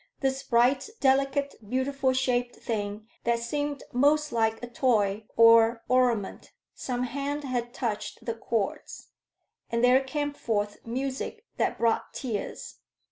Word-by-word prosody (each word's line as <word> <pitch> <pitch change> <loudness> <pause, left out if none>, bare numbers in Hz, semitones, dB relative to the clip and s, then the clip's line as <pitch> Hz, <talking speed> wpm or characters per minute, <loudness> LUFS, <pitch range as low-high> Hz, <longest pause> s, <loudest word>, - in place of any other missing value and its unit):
This 270 -1 0
bright, 255 - +2
delicate, 275 +1 +2 0.2
beautiful 260 +1 +1
shaped 250 -2 0
thing 210 -1 -4 0.2
that 235 0 +2
seemed 290 +4 -3
most 300 +4 +3
like 225 0 0
a - - -4
toy 220 -4 +1
or 230 0 +6
ornament 245 -5 +1 0.2
some 250 -1 -3
hand 280 +3 -3
had 245 -3 -2
touched 235 -5 -4
the 230 - -1
chords, 225 -2 -3 0.6
and 230 +1 0
there 255 +2 +5
came 290 +2 -2
forth 205 -6 -2
music 270 - -4
that - - 0
brought 230 -1 0
tears. 230 -6 -5
245 Hz, 130 wpm, -27 LUFS, 230-275 Hz, 0.6 s, or